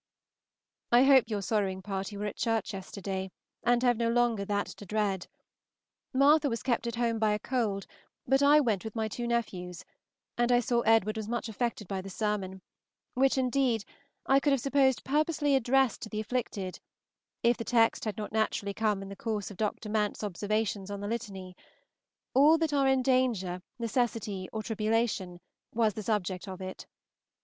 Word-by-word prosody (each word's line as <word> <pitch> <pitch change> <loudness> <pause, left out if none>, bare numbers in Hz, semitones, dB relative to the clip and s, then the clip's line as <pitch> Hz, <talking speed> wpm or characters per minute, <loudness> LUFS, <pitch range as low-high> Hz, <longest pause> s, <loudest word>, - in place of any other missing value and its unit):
I 240 +2 +7
hope 270 -2 +6
your 205 -2 -2
sorrowing 190 -2 -1
party 195 +1 -4
were 205 - -3
at 210 - -4
church 225 -3 -1
yesterday, 190 0 -5 0.3
and 240 0 +3
have 245 -2 +3
no 230 0 +1
longer 235 -3 +2
that 205 0 0
to - - -10
dread. 200 -2 -1 0.8
Martha 285 +2 +4
was 230 -2 -3
kept 240 -2 0
at 235 - -3
home 230 -1 0
by 215 -1 +3
a - - +1
cold, 215 -4 -1 0.4
but 270 +2 +3
I 290 +2 +7
went 220 -8 0
with 220 0 -7
my 220 -1 0
two 240 +3 -4
nephews, 185 -7 -3 0.5
and 240 0 +3
I 245 - +5
saw 240 0 +1
Edward 225 -1 +3
was 215 -1 -4
much 235 -1 -2
affected 220 -2 -3
by 190 -1 -3
the 195 - -8
sermon, 190 -2 -3 0.5
which, 270 +1 +3
indeed, 255 -4 +1 0.4
I 270 +1 +5
could 285 0 +2
have 275 - +2
supposed 270 0 +2
purposely 295 0 +1
addressed 265 0 +2
to 220 - -6
the 215 - -4
afflicted, 210 -5 -3 0.6
if 235 0 +4
the 230 - -4
text 230 -1 +2
had 215 0 -3
not 210 - -5
naturally 215 -2 0
come 210 -2 0
in 195 - -9
the 200 - -7
course 215 -2 -3
of 195 - -11
Dr. 215 0 -2
Mant's 210 0 -1
observations 205 0 -2
on 200 0 -5
the 205 - -4
Litany: 200 -5 -5 0.8
'All 295 +5 +6
that 320 -2 0
are 275 -1 +3
in 265 -1 +3
danger, 235 -9 +1 0.2
necessity, 230 -5 -2
or 220 -1 -4
tribulation,' 215 -5 -1 0.4
was 220 -2 +2
the 215 - -5
subject 200 -3 -2
of 190 -1 -7
it. 185 0 -7
220 Hz, 180 wpm, -30 LUFS, 200-245 Hz, 0.8 s, I